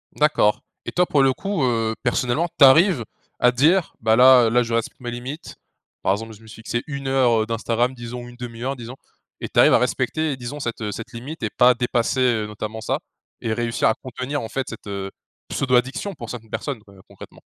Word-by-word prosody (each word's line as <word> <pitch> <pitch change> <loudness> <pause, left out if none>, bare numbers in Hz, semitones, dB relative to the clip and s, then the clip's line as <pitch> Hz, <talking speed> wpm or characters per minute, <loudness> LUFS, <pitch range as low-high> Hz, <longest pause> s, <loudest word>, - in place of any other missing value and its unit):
D'accord 150 -8 +2 0.2
et - - -4
toi 180 - +2
pour 145 -5 +2
le 135 - +4
coup, 195 +2 -2
heu, 115 -3 0
personnellement 125 +6 +1
tu 140 - +10
arrives 155 - +5 0.4
à 125 - +5
dire: 160 +8 +3
«Bah, 110 0 +3
là, 130 0 +8
heu, - - +2
là, 120 +2 +3
je 115 0 -5
respecte 115 -1 -2
mes 120 -1 -5
limites. 125 +6 -7 0.5
Par - - +1
exemple 110 +3 -3
je 105 - -16
me 110 - -16
suis 110 - -11
fixé 120 +1 -3
1 140 -2 -5
heure, 125 -4 +3
heu, - - -4
d'Instagram 115 +2 0
disons, 120 0 -7
1/2 120 -1 -8
heure 135 +2 -2
disons» 120 0 -9 0.5
et - - -3
tu - - +1
arrives - - +7
à - - +6
respecter 155 -1 0
et - - -7
disons 130 +4 -6
cette, 120 -5 -4
heu, 105 -1 -2
cette 115 +2 -8
limite 135 +7 -8
et 110 - 0
pas 125 +4 +5
dépasser, 120 +1 0
heu, 115 -4 +2
notamment 110 +1 -6
ça? 110 - -1 0.4
Et 110 - -1
réussir 115 0 0
à 110 - +4
contenir 130 +3 -5
en 110 - -6
fait 135 +3 -3
cette, 115 - -10
heu, 100 -1 -4 0.4
pseudo 130 -2 +1
addiction 130 +11 0
pour 115 -6 -8
cette 115 -3 -8
personne 130 -6 -4
qure 100 -2 -18
concrètement? - - -14
120 Hz, 225 wpm, -22 LUFS, 115-135 Hz, 0.5 s, tu